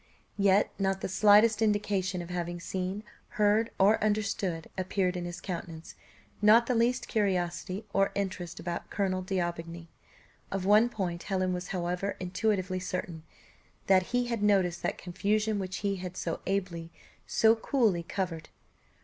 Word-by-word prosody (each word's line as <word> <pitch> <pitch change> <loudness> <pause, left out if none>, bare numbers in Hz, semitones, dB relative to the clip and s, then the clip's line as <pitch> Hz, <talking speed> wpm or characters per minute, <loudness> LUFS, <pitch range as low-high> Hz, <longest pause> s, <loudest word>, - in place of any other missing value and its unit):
Yet 200 +1 +4
not 195 0 0
the - - -2
slightest 210 +3 +5
indication 200 -4 0
of 170 - -9
having 175 -1 -3
seen, 190 +4 -4 0.3
heard, 210 +2 +3
or 205 +3 +4
understood, 200 -5 -1
appeared 185 -1 0
in 175 -1 -3
his 175 0 -6
countenance, 170 -3 -6 0.5
not 220 +3 +6
the 250 - 0
least 240 +2 +1
curiosity 185 -1 -1
or 195 0 +2
interest 185 -3 -3
about 170 0 -5
Colonel 190 -2 -1
D'Aubigny. 170 -3 -3 0.6
Of 190 -1 -3
one 210 +4 +5
point 175 -6 -3
Helen 185 -2 -1
was 180 +1 -4
however 180 +2 -2
intuitively 185 0 -1
certain, 180 -3 -4 0.6
that 185 -1 +4
he 245 0 +1
had 235 -3 -2
noticed 190 -4 +2
that - - -2
confusion 210 +4 -1
which 190 -1 -4
he 200 -1 0
had 180 0 -7
so 165 - -3
ably, 180 -4 -2 0.4
so 225 0 +4
coolly 225 - +1
covered. 170 -2 -4
190 Hz, 145 wpm, -29 LUFS, 180-210 Hz, 0.6 s, not